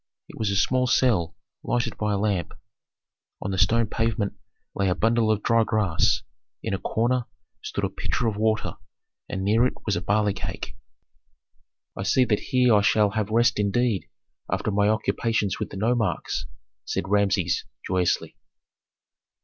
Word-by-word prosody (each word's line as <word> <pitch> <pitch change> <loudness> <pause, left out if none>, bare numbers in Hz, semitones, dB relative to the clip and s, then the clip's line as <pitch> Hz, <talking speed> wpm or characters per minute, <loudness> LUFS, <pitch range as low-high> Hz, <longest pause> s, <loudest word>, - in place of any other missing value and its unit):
It - - -12
was 110 -2 0
a 100 - 0
small 125 +5 +2
cell 115 -9 +2 0.3
lighted 120 -1 -1
by 105 -1 -1
a - - +1
lamp. 100 -5 -1 0.8
On 100 - -4
the 95 - -1
stone 115 +3 +4
pavement 110 -1 -1 0.4
lay 100 -1 0
a 90 - +1
bundle 115 0 +2
of 105 -1 +1
dry 115 -1 +4
grass; 105 -7 +1 0.4
in - - -2
a 95 - -1
corner 120 +2 0 0.4
stood - - -4
a - - +1
pitcher 125 - -2
of 110 -2 0
water, 110 +1 0 0.5
and 95 - -3
near 110 +4 +3
it - - -5
was 105 - +1
a 85 - -2
barley 105 +1 +1
cake. - - -6 1.2
"I - - -5
see 125 +7 +3
that 105 -3 +1
here 125 -2 +4
I 105 - +5
shall 105 +1 +3
have 110 -1 -1
rest 115 0 +3
indeed 105 0 0 0.4
after - - -1
my 100 +1 +2
occupations 110 -1 0
with - - -3
the - - -8
nomarchs," 115 +2 -1 0.4
said 85 - -3
Rameses, 100 -3 +1 0.2
joyously. 90 -2 0
105 Hz, 160 wpm, -25 LUFS, 100-115 Hz, 1.2 s, I